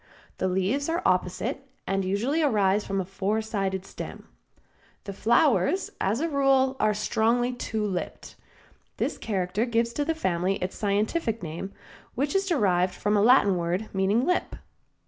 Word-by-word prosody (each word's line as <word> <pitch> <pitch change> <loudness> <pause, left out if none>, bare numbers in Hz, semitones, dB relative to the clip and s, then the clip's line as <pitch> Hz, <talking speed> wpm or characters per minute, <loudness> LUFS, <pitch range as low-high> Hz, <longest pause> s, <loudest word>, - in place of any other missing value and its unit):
The 185 - +1
leaves 195 - 0
are 335 +2 -1
opposite 190 +9 0 0.2
and 195 0 0
usually 225 - 0
arise 210 -7 +2
from 195 0 -1
a 190 - -2
four 195 +3 -1
sided 195 -3 -2
stem. - - -8 0.8
The 200 - -6
flowers, 275 - +2
as 210 +7 0
a 330 - +1
rule, 270 -3 +2
are 215 -1 +2
strongly 230 +4 +1
two 220 -3 -3
lipped. 185 -3 -5 0.6
This - - -2
character 195 0 -1
gives 235 -1 0
to 290 - 0
the 325 +2 -1
family 185 - 0
its 185 -1 -4
scientific 215 - -1
name, 170 +4 -5 0.4
which 280 +3 -1
is 390 0 +1
derived 190 - +2
from 210 +1 0
a 205 - +3
Latin 210 -5 +5
word 175 +5 -2
meaning 200 +6 +2
lip. 360 +2 0
210 Hz, 155 wpm, -26 LUFS, 190-260 Hz, 0.8 s, Latin